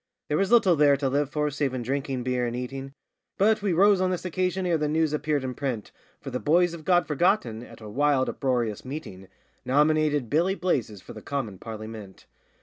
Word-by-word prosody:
There 150 Hz, -, +1 dB
was 195 Hz, +2 st, 0 dB
little 200 Hz, -7 st, +5 dB
there 145 Hz, -2 st, +4 dB
to 135 Hz, -1 st, -1 dB
live 140 Hz, +1 st, 0 dB
for 150 Hz, 0 st, -1 dB
save 140 Hz, -2 st, -1 dB
in 125 Hz, -, -3 dB
drinking 135 Hz, 0 st, -2 dB
beer 125 Hz, -1 st, 0 dB
and 120 Hz, -, -4 dB
eating; 135 Hz, +2 st, -6 dB, 0.4 s
But 215 Hz, +2 st, +3 dB
we 200 Hz, -2 st, 0 dB
rose 195 Hz, +2 st, +4 dB
on 185 Hz, -, +2 dB
this 185 Hz, 0 st, -3 dB
occasion 185 Hz, +1 st, -1 dB
ere 175 Hz, -2 st, +2 dB
the 150 Hz, -, 0 dB
news 155 Hz, 0 st, +1 dB
appeared 150 Hz, -2 st, 0 dB
in 130 Hz, -1 st, -3 dB
print, 125 Hz, -6 st, -4 dB, 0.3 s
For 135 Hz, -, -8 dB
the 125 Hz, -, -2 dB
boys 170 Hz, +3 st, +3 dB
of 160 Hz, -3 st, -9 dB
God 175 Hz, -1 st, +3 dB
Forgotten, 150 Hz, -, +1 dB
at 120 Hz, -, -13 dB
a 110 Hz, -, -9 dB
wild, 135 Hz, +3 st, +1 dB
uproarious 120 Hz, -6 st, -1 dB
meeting, 130 Hz, -9 st, -8 dB, 0.4 s
Nominated 150 Hz, 0 st, +2 dB
Billy 170 Hz, -, +1 dB
Blazes 120 Hz, -, -2 dB
for -, -, -10 dB
the -, -, -10 dB
commin 120 Hz, -10 st, -4 dB
Parlymint. 110 Hz, -3 st, -9 dB
145 Hz, 205 wpm, -26 LUFS, 125-170 Hz, 0.4 s, little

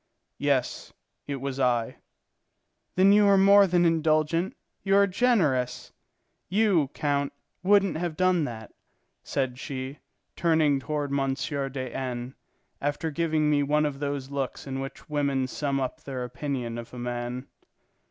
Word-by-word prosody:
"Yes, 140 Hz, -3 st, 0 dB, 0.3 s
it 140 Hz, -, -2 dB
was 135 Hz, 0 st, -4 dB
I." 120 Hz, -3 st, +1 dB, 1.0 s
"Then 190 Hz, +2 st, +6 dB
you 205 Hz, 0 st, +6 dB
are 200 Hz, -1 st, +6 dB
more 200 Hz, +1 st, +7 dB
than 175 Hz, -1 st, +3 dB
indulgent, 160 Hz, +1 st, +1 dB, 0.2 s
you 195 Hz, 0 st, +2 dB
are 200 Hz, 0 st, +6 dB
generous. 180 Hz, -, +1 dB, 0.6 s
You, 190 Hz, -6 st, +3 dB
count, 140 Hz, -1 st, 0 dB, 0.3 s
wouldn't 195 Hz, -1 st, +3 dB
have 165 Hz, -2 st, -3 dB
done 185 Hz, -3 st, +3 dB
that," 110 Hz, -4 st, -8 dB, 0.5 s
said 130 Hz, -2 st, -2 dB
she, 135 Hz, 0 st, -5 dB, 0.4 s
turning 160 Hz, -4 st, +3 dB
toward 145 Hz, 0 st, -3 dB
M. 135 Hz, -1 st, +1 dB
de 135 Hz, -2 st, -3 dB
N., 125 Hz, -1 st, -4 dB, 0.5 s
after 145 Hz, +3 st, -1 dB
giving 155 Hz, -1 st, +1 dB
me 150 Hz, -1 st, +3 dB
one 150 Hz, +2 st, +2 dB
of 140 Hz, -2 st, -3 dB
those 140 Hz, -2 st, -3 dB
looks 140 Hz, -2 st, -3 dB
in 135 Hz, -1 st, -4 dB
which 135 Hz, +4 st, -7 dB
women 140 Hz, -3 st, 0 dB
sum 140 Hz, +1 st, -2 dB
up 130 Hz, -2 st, -3 dB
their 130 Hz, -2 st, -5 dB
opinion 125 Hz, -2 st, -4 dB
of 115 Hz, 0 st, -9 dB
a -, -, -8 dB
man. 120 Hz, +1 st, -4 dB
145 Hz, 140 wpm, -27 LUFS, 130-165 Hz, 1.0 s, more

